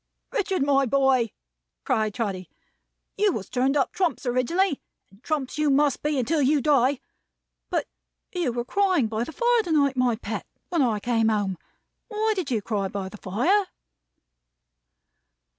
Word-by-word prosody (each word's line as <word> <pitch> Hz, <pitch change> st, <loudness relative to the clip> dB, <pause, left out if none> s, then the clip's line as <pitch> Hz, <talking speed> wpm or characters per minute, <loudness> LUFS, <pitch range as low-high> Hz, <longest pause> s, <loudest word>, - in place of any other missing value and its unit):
"Richard, 390 Hz, -, 0 dB
my 275 Hz, -1 st, +3 dB
boy!" 265 Hz, -3 st, +3 dB, 0.5 s
cried 215 Hz, -, 0 dB
Trotty. 195 Hz, -6 st, -3 dB, 0.7 s
"You 410 Hz, 0 st, +3 dB
was 195 Hz, -, -6 dB
turned 265 Hz, +3 st, +1 dB
up 275 Hz, -, +1 dB
Trumps 355 Hz, -6 st, -1 dB
originally, 275 Hz, +8 st, +1 dB, 0.3 s
and 195 Hz, +3 st, -21 dB
Trumps 295 Hz, -1 st, -3 dB
you 300 Hz, -1 st, +3 dB
must 280 Hz, 0 st, +2 dB
be 300 Hz, -1 st, 0 dB
until 295 Hz, +5 st, +1 dB
you 285 Hz, +2 st, +3 dB
die! 275 Hz, -1 st, +3 dB, 0.7 s
But -, -, 0 dB, 0.5 s
you 345 Hz, -8 st, -1 dB
were 240 Hz, 0 st, -3 dB
crying 375 Hz, -, +2 dB
by 220 Hz, +1 st, -2 dB
the -, -, -8 dB
fire 480 Hz, +4 st, +2 dB
to 355 Hz, -6 st, -5 dB
night, 280 Hz, -3 st, +3 dB
my 250 Hz, -2 st, +2 dB
pet, 225 Hz, -, -5 dB, 0.2 s
when 340 Hz, -4 st, +1 dB
I 230 Hz, -5 st, +1 dB
came 225 Hz, 0 st, +1 dB
home. 205 Hz, -3 st, 0 dB, 0.5 s
Why 435 Hz, 0 st, 0 dB
did 360 Hz, -7 st, -3 dB
you 225 Hz, -5 st, -1 dB
cry 200 Hz, -3 st, -1 dB
by 190 Hz, 0 st, -5 dB
the 210 Hz, -, -11 dB
fire?" 280 Hz, -, +1 dB
270 Hz, 160 wpm, -25 LUFS, 230-325 Hz, 0.7 s, my